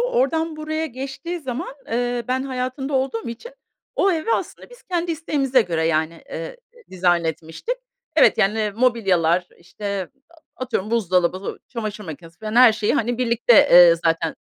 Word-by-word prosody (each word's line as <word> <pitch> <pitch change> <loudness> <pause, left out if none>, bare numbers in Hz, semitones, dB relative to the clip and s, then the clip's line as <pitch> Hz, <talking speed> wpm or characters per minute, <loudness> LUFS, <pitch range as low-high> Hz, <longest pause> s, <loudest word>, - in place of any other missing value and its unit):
Oradan 475 -11 0
buraya 315 +1 -3
geçtiği 275 +7 -6
zaman, 270 +2 -5
eee, 245 0 -1
ben 260 +1 0
hayatında 265 +1 -3
olduğum 260 -3 -1
için 235 - -8 0.4
o 390 - +3
eve 330 +8 -1
aslında - - -4
biz - - -16
kendi 345 -2 -2
isteğimize 275 -5 +1
göre, 165 -4 -1
yani, 160 +1 -1
eee, 165 - -6 0.3
ı - - -35
dizayn 175 -2 +1
etmiştik. 160 - -4 0.4
Evet, - - +5
yani, 210 +1 +1
mobilyalar 185 -8 +2
işte, 200 +1 -5 0.2
a 340 - -21 0.3
atıyorum 220 -5 -3
buzdolabı, 185 -4 0
çamaşır 215 -3 -5
makinesi 165 0 -10
falan 215 0 -5
her 245 -2 +8
şeyi, 215 +2 0
hani, 245 -3 0
birlikte, 240 -1 +2 0.2
eee, 175 -1 +9
zaten 165 -1 +1
235 Hz, 155 wpm, -22 LUFS, 180-275 Hz, 0.4 s, eee